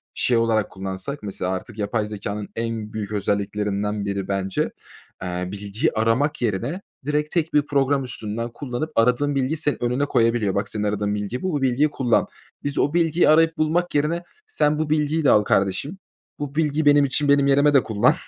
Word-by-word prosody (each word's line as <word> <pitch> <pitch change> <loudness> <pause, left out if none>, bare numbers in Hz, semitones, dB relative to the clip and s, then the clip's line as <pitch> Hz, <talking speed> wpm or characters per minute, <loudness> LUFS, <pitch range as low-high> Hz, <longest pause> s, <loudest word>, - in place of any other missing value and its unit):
şey 120 - +2
olarak 115 -2 +1
kullansak 95 +8 -5
mesela 95 -2 -3
artık 100 +4 -5
yapay 105 +1 -1
zekânın 105 0 -5
en 115 -1 -4
büyük 105 -1 -4
özelliklerinden 105 0 -1
biri 100 -1 -3
bence, 95 -1 -1 0.5
eee, 90 0 -3
bilgiyi 100 +2 -2
aramak 120 +7 +1
yerine 120 - -1 0.2
direkt 150 +1 -1
tek 165 -2 -1
bir 150 -1 +3
program 140 -1 +1
üstünden 115 -1 -4
kullanıp 145 +3 -4
aradığın 125 +5 +2
bilgiyi 135 +4 0
senin 150 -6 -1
önüne 125 +4 +1
koyabiliyor. 115 -6 +1
"Bak, 100 +1 -1
senin 105 -1 -3
aradığın 105 0 -1
bilgi 105 +5 -4
bu. 185 -3 -2
Bu 145 - -1
bilgiyi 135 +3 +2
kullan." 125 -5 +1 0.4
Biz 145 -1 -2
o 145 - +1
bilgiyi 170 0 +3
arayıp 165 +1 +4
bulmak 165 +2 0
yerine, 160 +4 +1 0.2
"Sen 150 - +1
bu 155 -1 -1
bilgiyi 155 +1 +1
de 140 - +4
al 105 - +5
kardeşim. 100 - 0 0.4
Bu 145 -1 -5
bilgi 155 -1 +1
benim 145 0 +6
için, 145 +2 0
benim 140 0 +4
yerime 140 +1 +4
de 135 - +5
kullan. 105 -2 +3
120 Hz, 180 wpm, -23 LUFS, 105-145 Hz, 0.5 s, benim